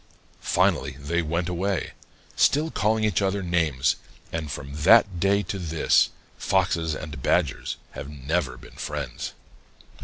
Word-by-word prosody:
Finally 70 -1 +1
they 85 +4 0
went 85 +2 -1
away, 90 +1 -1 0.4
still 155 +3 +3
calling 110 +1 +1
each 105 -5 +2
other 100 0 0
names, 80 -7 +1 0.4
and 80 -2 -3
from 70 +1 -6
that 90 +4 +6
day 100 +2 +3
to 100 - -4
this, 80 -3 +3 0.3
Foxes 85 -4 +1
and 75 -4 -7
Badgers 75 -1 0
have 70 - -7
never 75 +5 -2
been - - -14
friends. 70 -5 -4
85 Hz, 130 wpm, -25 LUFS, 75-95 Hz, 0.4 s, that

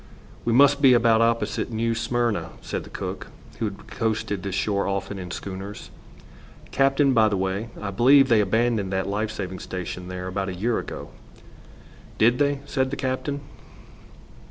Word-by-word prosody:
"We 120 - +1
must 140 +3 +5
be 130 -3 +7
about 115 -1 +4
opposite 115 +1 0
New 115 +1 0
Smyrna," 120 -1 -1
said - - -4
the - - -12
cook, - - -5 0.3
who 115 - 0
had 100 -2 -6
coasted 110 -3 -2
this 95 -1 -4
shore 100 0 0
often 100 0 -3
in 90 -1 -6
schooners. 95 +3 -7 0.8
"Captain, 135 0 +3
by 110 -3 +5
the 100 - 0
way, 95 +4 -2
I 100 -1 -4
believe 135 +6 +6
they 115 -4 +4
abandoned 110 -1 +1
that 95 0 0
life 105 +2 -1
saving 95 -3 -5
station 90 0 -6
there 90 0 -5
about 95 +1 -2
a 90 - -5
year 115 +6 0
ago." - - -7 1.1
"Did 120 +3 +4
they?" 140 -1 +1
said 130 -2 0
the 140 - -3
captain. 135 +2 -2
110 Hz, 165 wpm, -24 LUFS, 100-120 Hz, 1.1 s, be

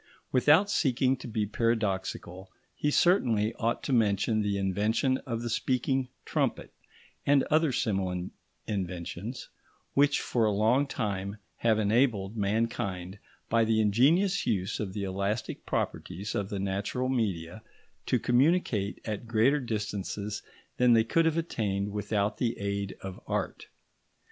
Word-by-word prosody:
Without 150 +9 +5
seeking 135 -8 +2
to 130 - -8
be 110 -2 -1
paradoxical, 95 -4 -2 0.2
he 150 - 0
certainly 120 - +3
ought 115 +1 0
to 140 - -1
mention 110 -1 +2
the 100 -1 0
invention 105 +7 +1
of 115 -2 -3
the 120 - -2
speaking 130 +2 0 0.2
trumpet - - -1 0.5
and 140 -1 +4
other 155 -1 +4
similar 95 -7 -1 0.4
inventions 95 +4 -4 0.4
which 145 +1 +4
for 115 -2 +1
a 105 - +2
long 115 +7 +3
time 100 -5 -3 0.2
have 115 -2 +2
enabled 110 -1 +2
mankind, 100 -3 -2 0.3
by 115 0 +3
the 110 0 +2
ingenious 145 - +3
use 95 -2 0
of 100 -3 -3
the 100 - -3
elastic 100 +3 -3
properties 95 +4 -3
of 100 -1 -2
the 100 - -3
natural 100 +6 -2
media, 105 -6 -2 0.5
to - - +3
communicate 125 - +2
at 110 +1 -4
greater 120 +6 +3
distances 105 -3 -3 0.4
than 125 -1 +5
they 115 -1 +5
could 165 +9 +2
have 165 0 +2
attained 105 - -1
without 105 0 -1
the 120 -1 0
aid 100 -1 -3
of 95 -1 -7
art. - - -3
110 Hz, 135 wpm, -29 LUFS, 100-125 Hz, 0.5 s, Without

